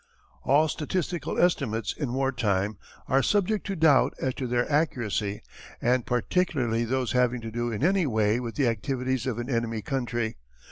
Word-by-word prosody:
All 150 +4 +4
statistical 165 0 -2
estimates 135 -10 +1
in 140 -6 -3
war 135 +1 0
time 105 -4 -1 0.3
are 135 +1 +3
subject 205 +5 +1
to 195 - -2
doubt 145 -6 +4
as 130 - -1
to 130 0 -4
their 120 0 +1
accuracy 115 -9 -1 0.4
and 125 0 +1
particularly 125 -3 0
those 130 +1 -1
having 125 -1 +2
to 115 0 -6
do 120 +1 -2
in 110 +4 -3
any 185 -1 +3
way 110 -1 +2
with 120 -2 -5
the 140 - +2
activities 125 +2 -1
of 120 -4 -2
an 120 0 -4
enemy 115 -4 -1
country. 120 -2 -2
125 Hz, 170 wpm, -27 LUFS, 115-145 Hz, 0.4 s, All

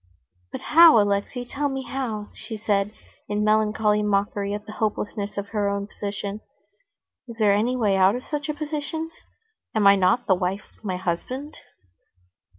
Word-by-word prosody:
"But - - -6
how, 325 -5 +7
Alexey, 205 +5 0
tell 285 +3 -2
me 270 -1 -3
how?" 230 -6 -4
she 220 - -8
said 205 -1 0 0.4
in 210 0 0
melancholy 215 0 +2
mockery 200 0 0
at 210 0 -4
the 215 - -8
hopelessness 210 -1 -3
of 200 0 -4
her 205 -2 0
own 200 0 -2
position. 205 0 -5 0.9
"Is 235 - -8
there 210 -3 +4
any 225 +5 +1
way 210 -6 +2
out 190 +3 +5
of 250 - -6
such 295 0 -4
a 300 - -1
position? 310 +2 -4 0.6
Am 215 -2 +2
I 200 0 +8
not 190 +6 +2
the 190 - +4
wife 185 +2 -1
of - - -30
my 185 -3 -2
husband?" 250 - -4
210 Hz, 165 wpm, -24 LUFS, 200-250 Hz, 0.9 s, I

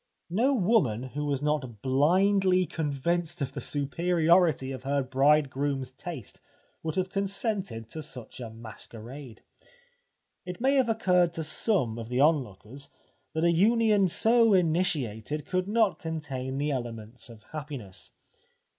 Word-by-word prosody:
No 250 +9 +2
woman 180 - +2
who 150 +1 -2
was 145 -1 -1
not 135 -8 -2
blindly 185 +7 +3
convinced 165 +3 -1
of 135 -2 -3
the - - -5
superiority 165 0 +2
of 130 -2 -6
her 140 +1 0
bridegroom's 135 0 +1
taste 135 - -8 0.4
would 160 -1 -3
have 185 0 -1
consented 195 - -2
to 160 - -5
such 130 -6 -9
a 120 -2 -6
masquerade. 115 +3 -9 1.0
It 180 -1 -7
may 265 +3 +3
have 260 -4 +3
occurred 180 -6 +2
to 165 - -3
some 150 - +1
of 115 0 -7
the 125 +1 -1
on 155 +3 +6
lookers 120 +7 -10 0.4
that 160 +1 -1
a 170 - +5
union 210 +2 +4
so 225 +4 +4
initiated 150 - 0
could 185 0 -1
not 215 -2 +2
contain 135 -5 -4
the 145 +1 0
elements 120 -2 -6
of 110 -2 -13
happiness. 140 -11 -7
150 Hz, 135 wpm, -28 LUFS, 130-185 Hz, 1.0 s, on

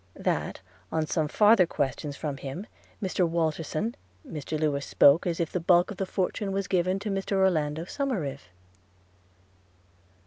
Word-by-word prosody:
– - - -34 0.2
That, - - -5 0.3
on 160 -1 0
some 155 0 0
farther 210 +1 +5
questions 145 -1 -2
from 145 -2 -4
him, 140 +9 -6 0.4
Mr 185 -2 +1
Walterson, 165 +5 -1 0.3
Mr 155 0 -4
Lewes 145 -2 0
spoke 145 +8 +5
as 170 -1 -1
if 165 -2 -1
the 180 - -1
bulk 175 +2 +4
of 200 - -7
the 195 - -2
fortune 195 +2 -1
was 195 0 -1
given 185 0 +1
to 205 +1 -4
Mr 195 +1 -2
Orlando 165 -5 +2
Somerive. 175 - -3
170 Hz, 150 wpm, -27 LUFS, 150-195 Hz, 0.4 s, farther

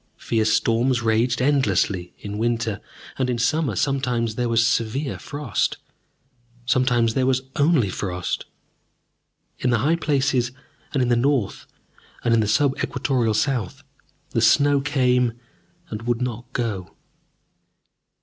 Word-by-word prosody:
Fierce 110 -2 0
storms 120 +3 +2
raged 115 +3 +1
endlessly 100 -10 +1
in 105 0 -6
winter, 115 -2 -1 0.4
and 130 -1 +1
in 125 - 0
summer 150 +5 +1
sometimes 125 -5 0
there 120 +1 -1
was 115 0 +3
severe 120 +5 -1
frost, 145 -6 -2 0.9
sometimes 125 -2 +2
there 130 +1 +1
was 130 0 +1
only 145 -6 +3
frost. 90 -2 -3 1.1
In 125 - 0
the 120 - +3
high 145 +9 +2
places 135 -5 +1 0.4
and 135 - +1
in 125 - 0
the 120 - +4
north 125 -3 0 0.6
and 115 -1 +3
the 105 - 0
sub 140 +5 +2
equatorial 125 -5 0
south, 115 -4 -1 0.5
the 115 - 0
snow 140 +5 +4
came 125 -4 +2 0.6
and 105 0 -4
would 120 0 -1
not 120 0 -4
go. 110 -8 -3
120 Hz, 130 wpm, -23 LUFS, 110-135 Hz, 1.1 s, the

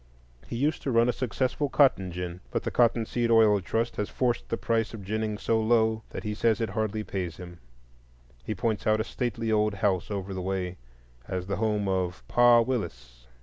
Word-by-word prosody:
He - - -5
used 145 +6 0
to - - -3
run 115 +1 +4
a - - +2
successful 130 +3 -1
cotton 115 -12 +3
gin, 90 0 -5
but - - -2
the - - -2
Cotton 115 -1 +3
Seed 120 +1 -1
Oil 110 -3 +5
Trust 115 +5 -2
has 105 - -2
forced 120 -2 -1
the 115 - -1
price 115 -1 -1
of 105 - -9
ginning 110 +1 -2
so 110 +1 +1
low 110 -1 +2
that - - -7
he 105 - -2
says 110 0 +1
it 115 -3 -2
hardly 110 0 -2
pays 90 -5 -4
him. 90 -1 -10 0.8
He 110 - -3
points 110 +2 -1
out 110 0 +3
a - - +1
stately 115 -1 -3
old 105 -1 +2
house 95 -2 0
over 100 -2 -4
the 95 - -4
way 90 -1 -3 0.5
as 90 -1 -3
the 100 +1 -2
home 105 -2 0
of 95 -1 -2
"Pa 120 -1 +6
Willis." 60 - -4
110 Hz, 200 wpm, -27 LUFS, 95-115 Hz, 0.8 s, Pa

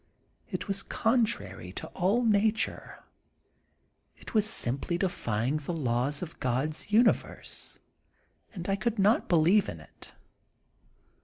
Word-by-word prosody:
It - - -4
was 195 0 0
contrary 150 - 0
to - - -5
all 200 +7 +1
nature; 215 0 0 1.1
it - - -11
was 215 -1 +3
simply 140 - -1
defying 130 - -1
the 150 +3 -4
laws 135 0 0
of 165 - -9
God's 135 +7 -2
universe, 230 +3 +1 0.7
and 180 -5 -7
I 195 - +2
could 230 +2 -1
not 205 +3 +3
believe 175 +4 +4
in 80 - -7
it. 75 - -16
175 Hz, 120 wpm, -29 LUFS, 130-210 Hz, 1.1 s, believe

